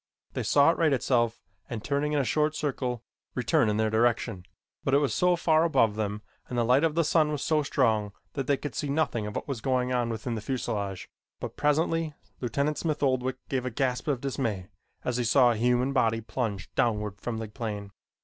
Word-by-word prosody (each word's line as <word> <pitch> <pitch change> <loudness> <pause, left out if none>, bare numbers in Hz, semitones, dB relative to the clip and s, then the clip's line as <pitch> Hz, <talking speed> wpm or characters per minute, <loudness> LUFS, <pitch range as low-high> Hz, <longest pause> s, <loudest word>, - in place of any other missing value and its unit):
They - - -2
saw 145 +2 +5
it - - -5
right 160 -3 +4
itself 120 -3 +1 0.3
and, 115 -3 -5
turning 145 +1 0
in - - +2
a - - +2
short 150 +3 +1
circle, 130 -6 -2 0.3
return 125 0 +2
in 105 - 0
their 110 0 +1
direction, 115 -4 +1 0.4
but 135 - +2
it - - +7
was 145 -1 +1
so 180 0 +3
far 160 -2 +3
above 115 -10 +3
them 105 0 -3 0.3
and 125 - -3
the 120 - +3
light 130 +5 +4
of 160 -2 +2
the 170 - +3
sun 150 -1 +2
so 155 +2 +1
strong 110 -7 +1 0.2
that 135 -2 -3
they 140 - +3
could 145 -1 -5
see 145 - -3
nothing 140 -8 0
of 105 - -6
what - - -4
was 135 -6 -4
going 130 0 +1
on 120 -2 +1
within 115 +2 -3
the 110 - -3
fuselage; 105 -6 -3 0.3
but - - -6
presently 155 +1 +1 0.2
Lieutenant 140 +5 -1
Smith 155 -3 -1
Oldwick 130 -1 +1
gave 130 -2 -1
a 130 - -2
gasp 125 +2 -1
of 135 -5 0
dismay 115 -9 -2 0.4
as 125 -1 0
he 125 - +1
saw 120 +1 +5
a - - 0
human 125 +4 +2
body 115 -4 +2
plunge 110 -3 -4
downward 105 -5 0
from 120 -2 -3
the 110 0 -4
plane. 105 -3 -5
125 Hz, 210 wpm, -28 LUFS, 110-145 Hz, 0.4 s, it